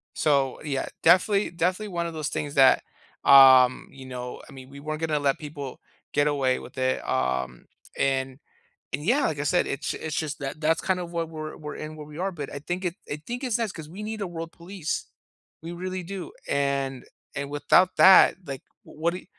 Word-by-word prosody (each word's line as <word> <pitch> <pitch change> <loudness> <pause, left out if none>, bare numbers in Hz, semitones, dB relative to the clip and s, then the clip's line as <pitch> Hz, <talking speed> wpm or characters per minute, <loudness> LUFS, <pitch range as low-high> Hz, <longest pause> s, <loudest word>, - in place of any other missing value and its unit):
So, 140 -3 +1
yeah, 140 -3 -2 0.2
definitely 190 +4 +4
definitely 185 +5 -1
one 170 -2 -2
of 165 - -6
those 155 -2 -3
things 145 -1 -4
that, 135 -1 +6 0.4
um, 130 -2 +7
you 135 -1 -12
know, 125 -1 -7
I - - -13
mean, 130 0 -11
we 140 +1 -11
weren't 155 +2 -5
gonna 155 -2 0
let 140 -1 +1
people 145 -3 -7 0.3
get 145 +1 +3
away 135 -3 +1
with - - -12
it. 130 0 -1
Um, 65 -1 -1 0.3
and 135 -1 0 0.5
and 145 +3 -2
yeah, 255 - +2
like 150 -3 -1
I 145 - -1
said, 175 +4 +2
it's 140 - -3
it's 155 -2 -5
just 150 -2 -3
that 135 +2 -5
that's 160 +1 +2
kind 185 -1 0
of 175 -1 -6
what 165 -1 -2
we're 155 -1 -7
we're 150 -1 -7
in, 155 0 -7
where 150 -1 -9
we 150 +1 -11
are. 190 +2 -1
But 150 -5 -6
I 140 - -5
think 180 +5 -4
it 175 0 -2
I 150 +1 -4
think 245 +3 -5
it's 245 -3 0
nice 225 -4 -1
'cause 155 -2 -9
we 195 +6 -8
need 215 0 -5
a 195 - -2
world 165 -1 -6
police. 175 -1 -5 0.6
We 170 - -6
really 185 +1 -5
do. 190 +1 -7 0.2
And 140 -2 -1 0.3
and 140 0 -3
without 145 +5 +3
that, 190 0 +8
like, 135 -2 -6 0.2
w - - -15
what 170 +1 +2
do 180 - -5
you - - -21
155 Hz, 215 wpm, -26 LUFS, 140-175 Hz, 0.6 s, that